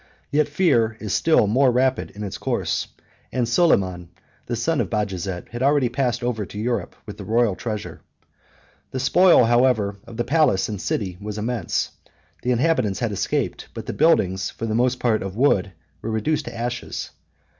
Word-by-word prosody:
Yet 150 0 +3
fear 135 -9 +2
is 105 -2 -3
still 160 -9 +4
more 130 +6 +3
rapid 130 +1 +1
in 105 - -8
its 100 - -5
course; - - -1 0.4
and 125 -2 0
Soliman, 95 - +2 0.4
the 120 - -1
son 150 +7 0
of - - -3
Bajazet, 95 -4 -3
had 120 +2 -6
already 140 -2 +3
passed 120 -1 -1
over 120 -3 -1
to 100 +2 -9
Europe 120 +3 -2
with - - -8
the - - -6
royal 115 -2 +2
treasure. 105 +2 -5 0.9
The 130 - -4
spoil, 170 +1 +5
however, 120 -4 +2
of 115 - -10
the 120 - +1
palace 145 -9 +2
and 105 -3 -5
city 95 -4 -2
was 105 0 -5
immense: 115 +1 -1 0.5
the 125 - -2
inhabitants 125 -6 +1
had 120 -3 -1
escaped; 100 - -2
but - - -6
the - - -4
buildings, 95 - +2
for 115 - -6
the 110 - -2
most 125 +2 +1
part 110 -3 +1
of 95 0 -5
wood, 105 -6 +2 0.3
were 115 - -4
reduced 145 +8 0
to - - -7
ashes. 120 +1 -4
120 Hz, 175 wpm, -23 LUFS, 105-130 Hz, 0.9 s, spoil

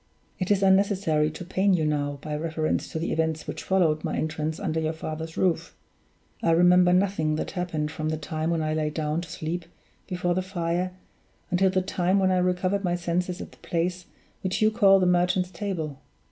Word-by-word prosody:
It 185 - -2
is 200 -1 +3
unnecessary 190 -5 +3
to 155 +3 -8
pain 190 +2 +2
you 160 -3 0
now, 145 -1 -1
by 150 -1 -3
reference 155 0 -1
to - - -3
the 165 - -2
events 160 -1 -1
which - - -5
followed 165 -5 +2
my - - -2
entrance 155 0 -2
under 160 -6 -1
your 160 0 -1
father's 160 0 -6
roof. 180 -3 0 0.7
I - - +1
remember 180 +1 +5
nothing 180 -5 +2
that - - -3
happened 165 -5 -2
from 155 0 -3
the 155 - -1
time 155 +1 -3
when 165 -2 0
I 155 0 0
lay 155 -1 0
down 155 +1 -2
to 175 - -9
sleep 165 +1 -4 0.4
before 180 -2 0
the 185 - 0
fire, 180 -1 -2 0.6
until 190 +1 +3
the 185 0 +1
time 185 0 +1
when 190 -1 +3
I 185 - +3
recovered 185 +2 0
my 175 -2 +1
senses 175 +1 -2
at - - -8
the - - -18
place 175 +1 -2 0.3
which 185 -1 -1
you 215 0 +4
call 200 -3 +5
the 185 - +2
Merchant's 180 +1 +2
Table. 165 -7 -4
175 Hz, 200 wpm, -26 LUFS, 155-185 Hz, 0.7 s, remember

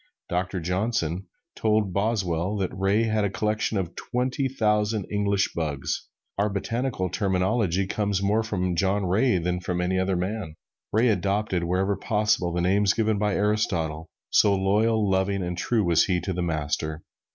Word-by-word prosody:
Doctor 90 +1 -1
Johnson 90 0 -1 0.3
told 105 -3 +1
Boswell 100 -2 0
that 95 -2 -2
Ray 100 +4 +2
had 110 -2 +1
a 100 - +1
collection 105 +2 -1
of 90 -2 -3
twenty 125 +2 -1
thousand 105 -4 +1
English 100 -1 +1
bugs. 75 -5 -3 0.3
Our 105 +1 +2
botanical 115 0 -2
terminology 95 -1 +1
comes 100 0 -1
more 100 +3 +2
from 90 -5 -1
John 95 +3 +1
Ray 100 +4 +2
than 90 +1 -1
from 90 0 -3
any 90 +1 0
other 95 0 +1
man. 90 -2 -3 0.4
Ray 115 +3 +3
adopted 100 -2 0
wherever 95 +3 +1
possible 105 -5 +1
the 85 +1 -1
names 100 +3 +3
given 110 -2 +1
by 105 -1 +1
Aristotle, 85 -7 0 0.2
so 100 -1 +5
loyal, 105 +3 +2
loving 95 0 +1
and 90 0 -3
true 110 +5 0
was 85 -3 +4
he 90 -2 +1
to 95 +2 -3
the 90 - -2
Master. 80 -1 -2
100 Hz, 160 wpm, -25 LUFS, 90-105 Hz, 0.4 s, so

